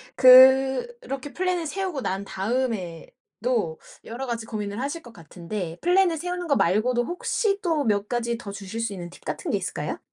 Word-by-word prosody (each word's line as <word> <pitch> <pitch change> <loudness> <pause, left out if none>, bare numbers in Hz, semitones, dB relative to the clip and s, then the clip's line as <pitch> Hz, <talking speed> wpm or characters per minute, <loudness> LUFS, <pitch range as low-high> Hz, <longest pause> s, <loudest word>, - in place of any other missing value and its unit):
그렇게 265 - +5
플랜을 365 -2 -1
세우고 365 -3 -3
난 195 -3 -3
다음에도 205 -2 -3 0.2
여러 240 +4 -6
가지 230 -2 -3
고민을 210 -1 -4
하실 285 +5 -3
것 240 -5 -14
같은데 170 +1 -6
플랜을 355 -1 +3
세우는 355 +2 -4
거 280 - +3
말고도 240 +6 +2
혹시 395 - -1
또 320 -5 0
몇 205 -1 +1
가지 235 -1 -1
더 205 -4 -8
주실 200 +2 -7
수 230 -3 -2
있는 175 -2 -7
팁 - - -16
같은 - - -3
게 - - +2
있을까요? - - -4
240 Hz, 340 characters per minute, -25 LUFS, 205-315 Hz, 0.2 s, 그렇게